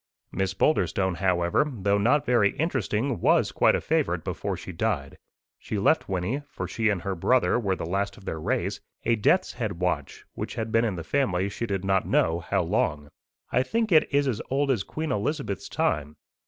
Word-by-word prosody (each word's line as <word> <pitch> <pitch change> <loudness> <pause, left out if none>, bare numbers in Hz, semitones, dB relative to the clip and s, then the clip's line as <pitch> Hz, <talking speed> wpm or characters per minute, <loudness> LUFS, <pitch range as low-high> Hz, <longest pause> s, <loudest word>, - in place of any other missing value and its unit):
Miss 95 -1 -1
Boulderstone, 95 - +1
however, 90 - +1
though 100 -4 +1
not 145 +8 +3
very 120 -6 +3
interesting, 130 - -1
was - - +3
quite - - +4
a - - 0
favourite - - 0
before - - -3
she - - -8
died. - - -2 0.4
She 105 - -4
left 105 +9 +2
Wynnie 95 +9 -1
for - - -5
she 115 -2 0
and 100 -4 -1
her 100 - -1
brother 120 +7 +2
were 100 -5 0
the - - -5
last 100 +4 -2
of 100 - -15
their 80 - -4
race 80 - -1 0.3
a 115 - +3
death's 175 - +2
head 110 -5 -3
watch, 85 -5 -3
which - - -5
had 110 -1 -3
been 115 +1 +3
in 105 -5 -1
the 85 - -5
family 95 - 0
she 115 +3 -4
did 95 -2 -2
not 95 -1 +1
know 80 +1 +2
how 95 +2 0
long. 80 -5 -1 0.4
I 125 - +3
think 225 - -1
it 155 -2 +5
is 140 0 +2
as 115 -5 -1
old 140 +1 +1
as 120 -7 +1
Queen 155 +8 -4
Elizabeth's 105 - -2
time. 75 0 -1
100 Hz, 195 wpm, -26 LUFS, 95-130 Hz, 0.4 s, it